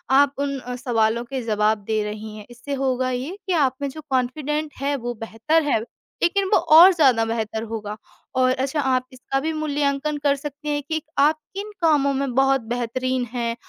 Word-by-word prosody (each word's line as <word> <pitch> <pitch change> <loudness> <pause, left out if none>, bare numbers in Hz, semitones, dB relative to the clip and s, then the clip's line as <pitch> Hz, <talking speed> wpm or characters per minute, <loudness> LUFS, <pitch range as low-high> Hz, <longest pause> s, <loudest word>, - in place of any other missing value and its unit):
आप 280 0 +5
उन 280 -1 -1
अ, 250 0 -6
सवालों 235 -2 +1
के 265 +1 -4
जवाब 215 -1 +1
दे 215 -1 +1
रही 210 +1 -6
हैं। 210 - -10
इससे 240 +4 -7
होगा 255 -1 +1
ये 260 +9 -3
कि 370 - +1
आप 275 -5 +2
में 280 - -1
जो 310 +3 -9
कॉन्फिडेंट 290 +4 -1
है 285 +1 0
वो 240 -2 -4
बेहतर 225 +8 0
है, 290 -6 +2 0.4
लेकिन 390 +3 +2
वो - - +7
और 340 +5 +10
ज़्यादा 265 -9 +4
बेहतर 225 -1 -2
होगा 215 -2 -5 0.4
और 255 0 +4
अच्छा, 270 +3 -1
आप 255 -1 +1
इसका 255 +2 -2
भी 315 +3 -2
मूल्यांकन 295 -1 -1
कर 280 -1 +3
सकती 290 +1 -7
हैं 290 0 0
कि 315 0 -1 0.2
आप 305 +2 +4 0.2
किन 410 +2 -5
कामों 290 -4 +3
में 270 -1 -2
बहुत 270 0 +3
बेहतरीन 255 +1 -1
हैं। 235 -1 -1
265 Hz, 195 wpm, -23 LUFS, 240-295 Hz, 0.4 s, और